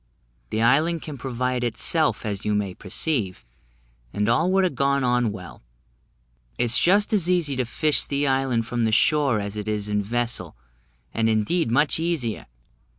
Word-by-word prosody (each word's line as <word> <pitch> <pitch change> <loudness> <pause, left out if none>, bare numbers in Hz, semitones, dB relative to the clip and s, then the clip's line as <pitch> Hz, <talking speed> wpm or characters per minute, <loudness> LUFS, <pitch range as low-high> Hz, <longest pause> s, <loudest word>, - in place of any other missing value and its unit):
The 110 +1 -1
island 155 +7 +2
can 145 -4 -7
provide 125 0 -2
itself, 145 +5 0
as 100 -2 -4
you 105 - 0
may 100 -3 -2
perceive, 100 - -2 0.7
and 105 0 -1
all 160 +11 +2
would 190 0 +3
have 180 - 0
gone 140 +1 +1
on 125 -2 +1
well. 90 -4 -10 1.0
It - - +1
is 120 0 +4
just 205 +5 +3
as 185 -4 +3
easy 170 -6 +1
to 130 - 0
'fish' 150 +5 +1
the 140 0 -1
island 130 -4 +1
from 120 +1 -2
the 110 - +1
shore 135 0 +3
as 100 0 -5
it 105 0 -5
is 105 -1 -2
in 105 0 0
vessel, 115 -5 -3 0.6
and 115 0 +1
indeed 115 +8 +1
much 145 +6 +2
easier. 160 -10 -2
125 Hz, 170 wpm, -23 LUFS, 110-150 Hz, 1.0 s, is